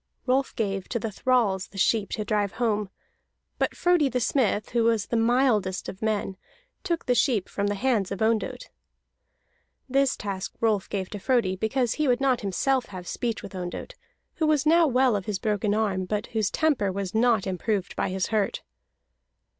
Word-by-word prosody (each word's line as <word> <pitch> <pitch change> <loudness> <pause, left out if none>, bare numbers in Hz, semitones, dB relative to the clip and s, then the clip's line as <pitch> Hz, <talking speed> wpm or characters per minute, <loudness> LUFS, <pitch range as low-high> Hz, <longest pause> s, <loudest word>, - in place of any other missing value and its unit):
Rolf 265 +1 +1
gave 195 -4 -2
to 240 - -1
the 225 -1 -3
thralls 205 -5 +1
the 195 - -14
sheep 205 +1 +2
to 215 - -2
drive 205 -1 0
home; 215 -4 0 0.7
but - - 0
Frodi 350 -5 +3
the 250 0 -1
Smith, 235 -4 +1
who 235 -1 +2
was 225 -3 +2
the - - -3
mildest 225 -5 +2
of 190 - -8
men, 210 -3 -1 0.5
took 340 -3 -2
the 250 - +3
sheep 240 - +2
from 200 0 -2
the 205 - 0
hands 215 -4 0
of 195 - -3
Ondott. 225 - -1 1.2
This 275 0 +2
task 195 -2 -5
Rolf 215 -4 +1
gave 190 -2 -3
to 205 - -5
Frodi, 230 -5 +1
because 225 +5 0
he 305 -1 0
would 245 -1 +3
not 265 -3 +2
himself 245 +6 0
have 185 -3 -9
speech 230 +3 -3
with - - -9
Ondott, 180 - -6 0.4
who 315 - +1
was 305 -2 +2
now 330 +1 +5
well 255 -3 +3
of 195 -2 -3
his 210 -2 -1
broken 210 -1 0
arm, 200 -4 0
but 210 +3 -2
whose 220 -3 +1
temper 285 -11 +1
was 190 -1 -4
not 225 -2 +3
improved 190 +1 -2
by - - -1
his 185 0 -2
hurt. 215 -2 0
220 Hz, 185 wpm, -26 LUFS, 200-255 Hz, 1.2 s, now